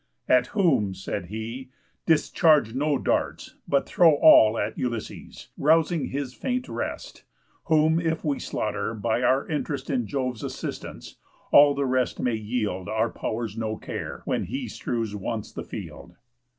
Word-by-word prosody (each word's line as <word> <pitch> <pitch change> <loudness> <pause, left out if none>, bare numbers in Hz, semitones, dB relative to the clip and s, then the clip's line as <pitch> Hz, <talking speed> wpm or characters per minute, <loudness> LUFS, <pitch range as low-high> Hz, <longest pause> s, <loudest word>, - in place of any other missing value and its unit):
"At 125 -1 +4
whom," 135 - +1
said 95 0 -5
he, 115 +6 -6 0.4
"discharge 155 - +3
no 145 +2 +1
darts, - - -2
but 140 -1 +2
throw 165 -4 +5
All 110 -7 +7
at - - -2
Ulysses, 120 -3 -5
rousing 160 +2 +3
his 135 -2 -4
faint 250 - -3
rest; - - -5 0.4
Whom 160 0 +3
if 160 -1 -1
we 145 -2 0
slaughter, 105 +1 -3
by 110 +2 -1
our 130 +2 +2
interest 145 -3 -3
In 125 -5 -1
Jove's 130 -3 -3
assistance, - - -7 0.3
all 145 0 +7
the 140 0 0
rest 130 -1 0
may 125 - 0
yield 105 -4 -3
Our 110 +1 0
pow'rs 110 -2 -4
no 110 -1 -3
care, - - -6
when - - -1
he - - -4
strews 115 -3 -3
once 110 +2 -4
the - - -6
field." 85 - -9
125 Hz, 150 wpm, -25 LUFS, 110-150 Hz, 0.4 s, All